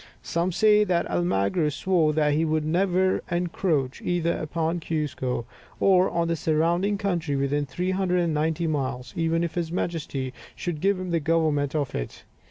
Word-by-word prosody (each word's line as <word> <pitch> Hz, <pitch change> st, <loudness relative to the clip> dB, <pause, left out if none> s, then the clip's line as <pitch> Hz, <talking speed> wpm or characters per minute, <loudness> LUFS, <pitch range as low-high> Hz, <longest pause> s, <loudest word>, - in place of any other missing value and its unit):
Some 170 Hz, +2 st, -1 dB
say 210 Hz, +3 st, +5 dB
that 180 Hz, -4 st, +1 dB
Almagro 95 Hz, -, +1 dB
swore 155 Hz, +3 st, +1 dB
that 150 Hz, -1 st, +2 dB
he 155 Hz, +2 st, +2 dB
would 155 Hz, -1 st, 0 dB
never 185 Hz, +3 st, +2 dB
encroach 170 Hz, -6 st, -1 dB
either 170 Hz, -1 st, 0 dB
upon 165 Hz, +2 st, -2 dB
Cuzco 145 Hz, -7 st, -2 dB, 0.3 s
or 185 Hz, -1 st, +4 dB
on 170 Hz, 0 st, 0 dB
the 165 Hz, -, 0 dB
surrounding 170 Hz, +6 st, +1 dB
country 175 Hz, -7 st, -1 dB
within 140 Hz, +1 st, 0 dB
390 175 Hz, -3 st, 0 dB
miles, 135 Hz, -5 st, -2 dB
even 165 Hz, 0 st, +1 dB
if 170 Hz, -, -2 dB
his 170 Hz, -2 st, -2 dB
Majesty 145 Hz, -7 st, -3 dB, 0.2 s
should 165 Hz, -4 st, -4 dB
give 195 Hz, 0 st, +2 dB
him 185 Hz, -1 st, -4 dB
the 170 Hz, -, +2 dB
government 155 Hz, -2 st, +1 dB
of 145 Hz, -3 st, -1 dB
it. -, -, -5 dB
165 Hz, 155 wpm, -25 LUFS, 150-175 Hz, 0.3 s, say